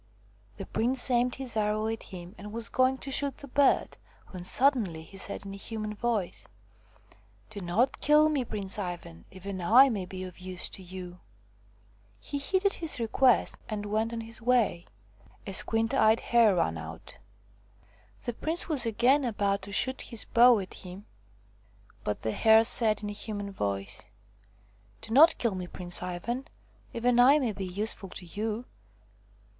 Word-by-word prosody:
The - - -6
prince 250 +3 0
aimed 245 0 +2
his 260 -3 -7
arrow 215 0 0
at 225 0 -3
him 180 0 -10
and 210 0 -10
was 230 +1 -5
going 260 +1 +2
to 270 - -7
shoot 280 -1 0
the 280 - -11
bird, 280 +1 +2 0.3
when 185 -2 -8
suddenly 210 - +1
he 180 - -15
said 200 +1 -5
in 195 - -7
a - - -8
human 215 +1 -5
voice: 210 -4 -3 0.5
" 105 -1 -30
Do 205 - -7
not 200 +8 0
kill 300 +1 +5
me, 295 -4 0
Prince 205 -3 -2
Ivan! 175 - -6
Even 190 0 -7
I 245 +10 +7
may 200 -6 -3
be 185 0 -7
of 185 -1 -9
use 185 0 -6
to 195 - -9
you." 180 -1 -9 1.0
He 285 - -4
heeded 380 +7 +1
his 325 -6 -2
request 235 +2 +2
and 210 -2 -4
went 215 +2 -1
on 230 -1 -4
his 225 0 -7
way. 230 -8 +1 0.6
A 195 - -6
squint 225 +4 0
eyed 220 -4 +4
hare 230 -5 +4
ran 80 - 0
out. 80 0 -10 1.1
The 240 - -3
prince 320 +8 -1
was 280 -7 0
again 245 +6 +3
about 200 -4 0
to 195 +1 -7
shoot 260 +6 +1
his 230 -3 -6
bow 240 0 +6
at 190 -2 -5
him, 185 +2 -9 1.0
but 105 - -3
the 110 - 0
Hare 220 - +5
said 220 -2 +4
in 205 - -3
a - - -6
human 205 -1 -4
voice: 100 - -4 0.4
" 105 0 -33
Do 225 - -6
not 315 +6 +7
kill 235 -4 0
me, 180 -1 -5
Prince 175 0 -3
Ivan. 180 +9 -4 0.4
Even 240 +1 +1
I 265 +4 +7
may 255 -6 0
be 195 -1 -5
useful 195 +1 -3
to 180 - -8
you." 215 +6 -4
215 Hz, 170 wpm, -28 LUFS, 185-245 Hz, 1.1 s, I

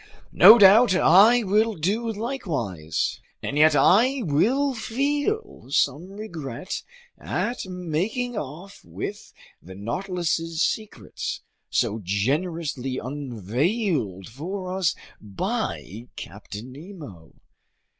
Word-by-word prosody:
No 225 - +10
doubt 205 0 +7
I 220 +7 +6
will 215 +2 +2
do 210 +8 -1
likewise. 155 - -3 0.2
And - - -3
yet 155 0 +5
I 235 - +4
will 250 - +2
feel 290 - -2
some 145 +7 0
regret 175 - -6 0.4
at 240 -4 -3
making 185 - -2
off 170 +5 -7
with 205 +1 -7 0.3
the 95 +2 -12
Nautilus's 165 - -2
secrets, 200 - -4 0.3
so 110 - 0
generously 135 - -1
unveiled 130 - -2
for 185 - -5
us 180 -8 +1 0.3
by 105 +2 -4
Captain 105 +5 -9
Nemo! 145 - -11
170 Hz, 95 wpm, -24 LUFS, 130-215 Hz, 0.4 s, No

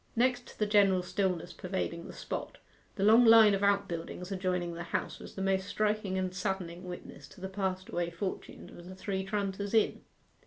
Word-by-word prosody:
Next 245 +1 +2
to - - -14
the 210 - +1
general 200 -3 +4
stillness 180 -2 -1
pervading 180 -2 -4
the - - -9
spot, - - -5 0.4
the 195 - -2
long 220 +4 +7
line 225 -2 +8
of 195 - 0
outbuildings 190 -2 -1
adjoining 180 -2 -1
the 170 - -6
house 170 - -3
was - - -11
the 195 - -3
most 195 0 +1
striking 210 -3 0
and 185 -1 -1
saddening 185 -3 -3
witness 180 -1 -9
to - - -16
the 190 - -4
passed 190 -1 -3
away 175 -1 -1
fortunes 180 +3 -6
of 175 - -12
the 185 - -9
Three 190 0 -3
Tranters 200 +1 -2
Inn. 220 - +2
190 Hz, 190 wpm, -31 LUFS, 180-205 Hz, 0.4 s, line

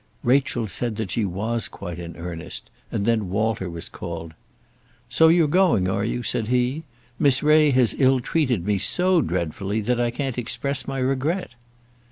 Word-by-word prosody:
Rachel 125 -2 +2
said 110 +4 -2
that 105 -4 -3
she 110 +1 0
was 110 +5 -2
quite 90 -3 -8
in 85 -1 -8
earnest, 85 -1 -7 0.2
and 100 - -1
then 110 -4 +1
Walter 105 -1 -1
was 85 0 -6
called. 85 -2 -7 0.8
"So 160 - +5
you're 165 -1 +5
going, 165 - +3
are 95 +2 0
you?" 120 +2 -2
said 110 -1 0
he. 125 +6 0 0.3
"Miss 140 -3 +4
Ray 150 0 +5
has 125 -4 +4
ill 130 -1 +4
treated 125 - 0
me 105 -1 +1
so 180 - +2
dreadfully 90 - -2
that 120 +3 0
I 120 0 +2
can't 125 +1 -3
express 140 +3 -2
my 135 0 -3
regret." 135 +6 -1
120 Hz, 170 wpm, -23 LUFS, 95-135 Hz, 0.8 s, So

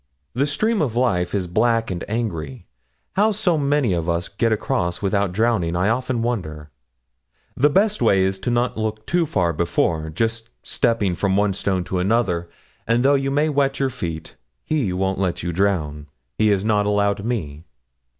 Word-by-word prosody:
The 135 +5 +1
stream 215 +8 0
of 125 -7 -1
life 105 -8 +1
is 95 -2 0
black 115 +4 +1
and 85 -1 -4
angry; 85 - -4 0.5
how 210 +3 +3
so 200 -5 +1
many 140 -7 +1
of 85 -1 -1
us 85 +1 -1
get 115 +3 0
across 90 -5 -1
without 100 -1 0
drowning, 100 -5 +1
I 90 +4 +2
often 125 0 -1
wonder. 80 -11 -4 0.8
The 145 +3 +4
best 205 +7 +2
way 95 -1 +4
is 95 0 -1
not 120 +1 +1
to - - -7
look 110 0 -3
too 175 -1 +1
far 90 -9 +1
before 80 0 0
just 115 +7 -2
from - - -32
one - - -45
stepping 100 -2 +1
stone 95 -1 -1
to 90 0 -2
another; 90 -4 0 0.4
and 115 +2 +2
though 140 - +5
you 135 -1 +1
may 145 +3 +2
wet 140 -2 0
your 135 -1 +1
feet, 85 -10 -6 0.3
He 140 -11 0
won't 95 +1 -1
let 90 -4 -1
you 85 0 -2
drown 80 -6 -1 0.3
He 110 - +2
has 100 -1 +2
not 105 -2 +2
allowed 100 -1 +1
me.' 80 -11 -3
105 Hz, 180 wpm, -22 LUFS, 90-120 Hz, 0.8 s, though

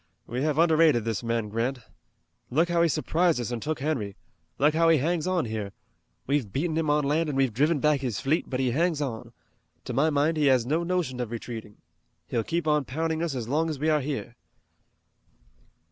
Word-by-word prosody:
We 125 +2 -4
have 150 0 0
underrated 160 -7 +4
this 115 -3 -1
man 115 -2 -1
Grant. 115 +5 -1 0.7
Look 165 +7 +2
how 170 -1 +2
he 170 - +5
surprised 165 +1 +1
us 120 0 -3
and 120 -2 -3
took 155 +1 -3
Henry! 120 -10 -2 0.4
Look 150 +2 +3
how 165 +1 +3
he 165 - +5
hangs 165 +4 0
on 185 -6 +1
here! 110 -3 -4 0.5
We've 135 -7 0
beaten 155 - -1
him 160 -2 0
on 150 0 +3
land 155 +3 +1
and 140 - -2
we've 135 -4 +2
driven 150 +7 +2
back 150 0 +2
his 125 -6 -3
fleet, 145 +4 0
but 130 - -2
he 130 -2 +1
hangs 165 +3 +1
on. 120 -4 -4 0.5
To 125 - -4
my 140 +6 +3
mind 155 +2 +1
he 150 -2 +3
has 130 -3 +4
no 155 +6 +1
notion 170 -7 -1
of 120 -3 -2
retreating. 115 -2 -7 0.5
He'll 115 +6 -1
keep 170 +4 -2
on 150 -2 +2
pounding 160 +4 -2
us 165 -5 -2
as 120 -3 -4
long 155 +5 +1
as 155 - -3
we 155 +4 0
are 150 -1 +2
here." 135 -4 -4
145 Hz, 205 wpm, -27 LUFS, 120-160 Hz, 0.7 s, he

